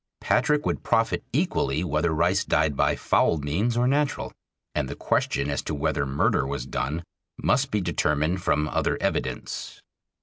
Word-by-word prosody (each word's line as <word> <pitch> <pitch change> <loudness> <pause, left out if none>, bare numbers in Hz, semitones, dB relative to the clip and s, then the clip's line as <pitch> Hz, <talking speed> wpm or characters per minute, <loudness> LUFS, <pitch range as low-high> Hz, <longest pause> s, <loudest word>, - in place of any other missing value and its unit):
Patrick 150 0 +2
would - - -1
profit 115 0 +1
equally 145 - 0
whether 80 0 0
Rice 80 +1 +2
died 75 -1 +1
by - - +2
foul 85 - +2
means 90 +12 -1
or 120 +1 +3
natural, 145 +2 0 0.4
and - - -1
the - - -5
question 70 - 0
as 70 - -1
to 75 - -4
whether 70 -1 0
murder 70 -1 +2
was 70 -3 -3
done 75 +5 -3 0.3
must 135 +2 +1
be 105 -4 0
determined 80 +1 0
from 75 -3 +1
other - - 0
evidence. - - -3
80 Hz, 160 wpm, -25 LUFS, 70-120 Hz, 0.4 s, or